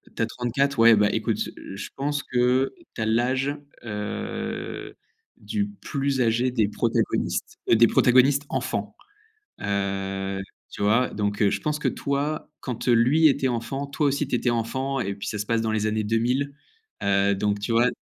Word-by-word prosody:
Tu -, -, -3 dB
as -, -, +3 dB
34, 125 Hz, +4 st, -1 dB
ouais, 115 Hz, 0 st, +8 dB
bah, 105 Hz, -1 st, +3 dB
écoute, -, -, 0 dB, 0.2 s
heu, -, -, -9 dB
je 95 Hz, -, -6 dB
pense 145 Hz, +1 st, -1 dB
que 125 Hz, +2 st, +2 dB, 0.2 s
tu -, -, -4 dB
as -, -, +1 dB
l'âge, 130 Hz, +5 st, +1 dB, 0.3 s
heu, 105 Hz, -2 st, -5 dB, 0.4 s
du 205 Hz, -2 st, -2 dB
plus 140 Hz, -9 st, -2 dB
âgé 120 Hz, +2 st, +2 dB
des 115 Hz, -4 st, +1 dB
protagonistes, 110 Hz, +2 st, -1 dB
heu, -, -, +6 dB
des 115 Hz, +1 st, +7 dB
protagonistes 130 Hz, +5 st, +4 dB
enfants. -, -, -3 dB, 0.7 s
Heu, 95 Hz, -1 st, -2 dB, 0.3 s
tu -, -, -5 dB
vois, 110 Hz, +5 st, +3 dB
donc, 105 Hz, -1 st, -2 dB
heu, 100 Hz, -, +4 dB
je -, -, -2 dB
pense 150 Hz, 0 st, -1 dB
que -, -, -2 dB
toi, 145 Hz, +2 st, -2 dB
quand 125 Hz, -1 st, -4 dB
lui 125 Hz, +7 st, +5 dB
était 135 Hz, -1 st, +1 dB
enfant, 125 Hz, +4 st, -3 dB
toi 145 Hz, +2 st, 0 dB
aussi 140 Hz, +1 st, +1 dB
tu 130 Hz, -, -2 dB
étais 125 Hz, 0 st, +1 dB
enfant, 130 Hz, +4 st, -1 dB
et 100 Hz, -5 st, -2 dB
puis 100 Hz, -, -6 dB
ça 105 Hz, -, -3 dB
se 105 Hz, -, -3 dB
passe 115 Hz, +1 st, +1 dB
dans 110 Hz, 0 st, -1 dB
les 110 Hz, -1 st, 0 dB
années 110 Hz, 0 st, 0 dB
2000. 125 Hz, +6 st, 0 dB, 0.5 s
Heu, 100 Hz, 0 st, +3 dB
donc 105 Hz, +1 st, 0 dB
tu 105 Hz, -, -4 dB
vois? 120 Hz, +2 st, +4 dB
120 Hz, 180 wpm, -25 LUFS, 105-135 Hz, 0.7 s, ouais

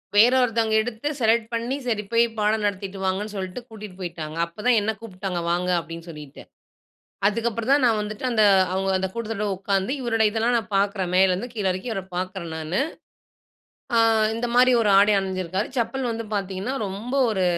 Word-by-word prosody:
வேற 230 Hz, +4 st, +7 dB
ஒருத்தவங்க 225 Hz, -2 st, +1 dB
எடுத்து 235 Hz, +4 st, -5 dB
செலக்ட் 225 Hz, -1 st, +2 dB
பண்ணி 235 Hz, +3 st, -1 dB
சரி 215 Hz, -3 st, 0 dB
போய் 230 Hz, 0 st, +4 dB
பாடம் 210 Hz, +1 st, +1 dB
நடத்திட்டு 195 Hz, -1 st, -3 dB
வாங்கன்னு 195 Hz, +3 st, -1 dB
சொல்லிட்டு 190 Hz, +4 st, -5 dB
கூட்டீட்டு 210 Hz, -4 st, -10 dB
போயிட்டாங்க. 165 Hz, -3 st, -6 dB
அப்போ 170 Hz, +4 st, -17 dB
தான் 245 Hz, -2 st, +5 dB
என்ன 220 Hz, +2 st, 0 dB
கூப்ட்டாங்க. 185 Hz, -4 st, -4 dB
வாங்க 180 Hz, +1 st, 0 dB
அப்பிடின்னு 165 Hz, 0 st, -6 dB
சொல்லிட்டு. 150 Hz, -3 st, -10 dB, 0.9 s
அதுக்கு 230 Hz, +3 st, +1 dB
அப்புறம் 230 Hz, +3 st, -3 dB
தான் 280 Hz, -2 st, +4 dB
நான் 225 Hz, -3 st, +3 dB
வந்துட்டு 210 Hz, +3 st, -5 dB
அந்த 220 Hz, -2 st, +3 dB, 0.3 s
அவுங்க 195 Hz, +1 st, 0 dB
அந்த 190 Hz, -, -1 dB
கூட்டத்தோட 225 Hz, -2 st, -3 dB
உக்காந்து 195 Hz, +4 st, -1 dB
இவருடைய 225 Hz, -3 st, +2 dB
இதெல்லாம் 230 Hz, +2 st, +1 dB
நான் 215 Hz, -2 st, -7 dB
பாக்கறேன். 195 Hz, -2 st, 0 dB
மேல 190 Hz, 0 st, +5 dB
இருந்து 200 Hz, +7 st, -3 dB
கீழ 205 Hz, -3 st, -2 dB
இறக்கி 185 Hz, +6 st, -5 dB
இவர 195 Hz, -3 st, -3 dB
பாக்கறேன் 185 Hz, -2 st, -4 dB
நானு. 160 Hz, +6 st, -2 dB, 1.2 s
ஆ -, -, +5 dB, 0.4 s
இந்தமாரி 245 Hz, +2 st, +3 dB
ஒரு 210 Hz, -, +2 dB
ஆடை 205 Hz, +1 st, +5 dB
அணிஞ்சிருக்காரு. 185 Hz, +1 st, -3 dB
செப்பல் 240 Hz, +1 st, -1 dB
வந்து 225 Hz, -1 st, -5 dB
பார்த்தீங்கன்னா 195 Hz, +5 st, -3 dB
ரொம்ப 205 Hz, +7 st, -5 dB, 0.2 s
ஒரு 190 Hz, -3 st, 0 dB
210 Hz, 175 wpm, -24 LUFS, 190-230 Hz, 1.2 s, வேற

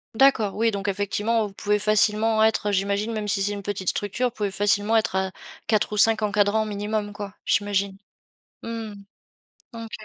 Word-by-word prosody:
D'accord. 225 Hz, -6 st, +3 dB
Oui 225 Hz, +1 st, +2 dB
donc 200 Hz, -1 st, -4 dB
effectivement 205 Hz, +3 st, 0 dB
vous 200 Hz, -, -13 dB
pouvez 210 Hz, +1 st, 0 dB
facilement 215 Hz, +1 st, +2 dB
être, 220 Hz, -1 st, +2 dB
heu, -, -, 0 dB
j'imagine 200 Hz, +3 st, 0 dB
même 215 Hz, -1 st, -3 dB
si 195 Hz, -1 st, +1 dB
c'est 205 Hz, -, 0 dB
une 205 Hz, -1 st, -5 dB
petite 195 Hz, -2 st, -2 dB
structure 205 Hz, +5 st, -1 dB
vous -, -, -5 dB
pouvez 210 Hz, -4 st, -3 dB
facilement 205 Hz, +2 st, +1 dB
être 220 Hz, -4 st, +1 dB
à 190 Hz, 0 st, 0 dB, 0.4 s
4 215 Hz, -2 st, +1 dB
ou -, -, -2 dB
5 220 Hz, +1 st, +5 dB
encadrants 210 Hz, +1 st, +2 dB
minimum 210 Hz, 0 st, -3 dB
quoi? 205 Hz, -2 st, -7 dB
J'imagine. 200 Hz, -1 st, 0 dB, 0.7 s
Mmh. 225 Hz, -2 st, -5 dB, 0.8 s
OK. 230 Hz, -1 st, -8 dB
210 Hz, 180 wpm, -24 LUFS, 200-220 Hz, 0.8 s, 5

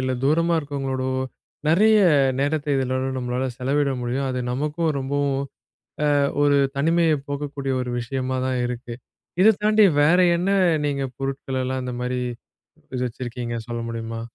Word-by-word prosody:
இல்ல 130 Hz, 0 st, -1 dB
தூரமா 165 Hz, +4 st, +3 dB
இருக்கிறவங்களோடவோ 135 Hz, -3 st, -2 dB, 0.5 s
நறைய 215 Hz, +7 st, +5 dB, 0.4 s
நேரத்த 145 Hz, +1 st, 0 dB
இதல 130 Hz, -1 st, 0 dB, 0.2 s
நம்மளால 125 Hz, +1 st, -2 dB
செலவிட 140 Hz, +2 st, +1 dB
முடியும். 125 Hz, +3 st, -2 dB
அது 125 Hz, -, -2 dB
நமக்கும் 150 Hz, +5 st, -1 dB
ரொம்பவும் 140 Hz, 0 st, -1 dB, 0.8 s
அ -, -, +3 dB, 0.3 s
ஒரு 145 Hz, -1 st, +4 dB, 0.2 s
தனிமையை 165 Hz, +2 st, +3 dB
போக்கக்கூடிய 140 Hz, -1 st, -3 dB
ஒரு 125 Hz, -, -3 dB
விஷயமா 130 Hz, +1 st, -2 dB
தான் 130 Hz, -1 st, -1 dB
இருக்கு. 120 Hz, 0 st, -5 dB, 0.5 s
இத 215 Hz, +3 st, +7 dB
தாண்டி 215 Hz, 0 st, +5 dB, 0.2 s
வேற 160 Hz, +5 st, +5 dB, 0.2 s
என்ன 180 Hz, +3 st, -1 dB, 0.4 s
நீங்க 140 Hz, -1 st, -1 dB, 0.2 s
பொருட்கள்லாம் 130 Hz, -1 st, -3 dB
இந்த 125 Hz, -1 st, -4 dB
மாரி 125 Hz, 0 st, -2 dB, 0.7 s
இது 125 Hz, -, -2 dB
வச்சிருக்கீங்க 120 Hz, 0 st, -5 dB
சொல்ல 120 Hz, 0 st, -3 dB
முடியுமா? 115 Hz, 0 st, -5 dB
135 Hz, 135 wpm, -23 LUFS, 125-145 Hz, 0.8 s, இத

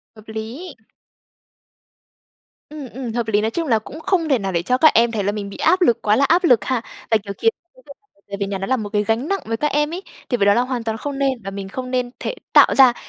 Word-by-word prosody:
Hợp 215 Hz, 0 st, -16 dB
lý. 230 Hz, +10 st, -7 dB, 2.0 s
Ừm, 295 Hz, -4 st, -8 dB
ừm, 245 Hz, -2 st, -6 dB
hợp 235 Hz, -1 st, -2 dB
lý. 210 Hz, -1 st, +2 dB
Nói 220 Hz, -, -1 dB
chung 330 Hz, +4 st, -2 dB
là 225 Hz, -3 st, +3 dB
cũng 295 Hz, +8 st, -10 dB
không 345 Hz, -3 st, 0 dB
thể 265 Hz, -, +3 dB
nào 195 Hz, -1 st, -3 dB
để 170 Hz, -2 st, 0 dB
cho 250 Hz, +7 st, +1 dB
các 310 Hz, +3 st, +6 dB
em 230 Hz, +1 st, +4 dB
thấy 210 Hz, -3 st, -2 dB
là 205 Hz, -, +1 dB
mình 205 Hz, -1 st, -5 dB
bị -, -, -10 dB
áp 370 Hz, +1 st, +2 dB
lực 240 Hz, -9 st, +3 dB
quá 210 Hz, 0 st, +3 dB
là 280 Hz, -, +3 dB
áp 345 Hz, +6 st, +3 dB
lực 245 Hz, -9 st, +4 dB
ha. 255 Hz, -3 st, 0 dB, 0.3 s
Và, 220 Hz, -, +6 dB
kiểu, 200 Hz, -1 st, -7 dB
khiến 455 Hz, -, +3 dB
cho 345 Hz, -, -55 dB
cái -, -, -20 dB
việc -, -, -12 dB
làm 415 Hz, -, -42 dB
bài 200 Hz, -, -32 dB
tập 200 Hz, -, -3 dB
về 200 Hz, -, -1 dB
nhà 195 Hz, -, -3 dB
nó 195 Hz, +1 st, -4 dB
là 260 Hz, -, +1 dB
một 210 Hz, -3 st, -5 dB
cái 210 Hz, 0 st, 0 dB
gánh 225 Hz, +6 st, -1 dB
nặng 395 Hz, +2 st, 0 dB
với 225 Hz, 0 st, -2 dB
các 300 Hz, -, 0 dB
em 295 Hz, +2 st, 0 dB
ấy, 375 Hz, +2 st, -5 dB, 0.3 s
thì 245 Hz, -, +1 dB
với 200 Hz, -, +2 dB
đó 200 Hz, -, +6 dB
là 240 Hz, -, +3 dB
hoàn 250 Hz, -2 st, -3 dB
toàn 225 Hz, -1 st, -3 dB
không 280 Hz, +3 st, -5 dB
nên 275 Hz, -1 st, +2 dB
và 195 Hz, -, -5 dB
mình 195 Hz, 0 st, -6 dB
không 255 Hz, +4 st, -6 dB
nên 250 Hz, -1 st, 0 dB
thể -, -, -4 dB, 0.2 s
tạo -, -, +6 dB
ra, 260 Hz, -3 st, +7 dB
240 Hz, 295 wpm, -20 LUFS, 215-290 Hz, 2.0 s, ra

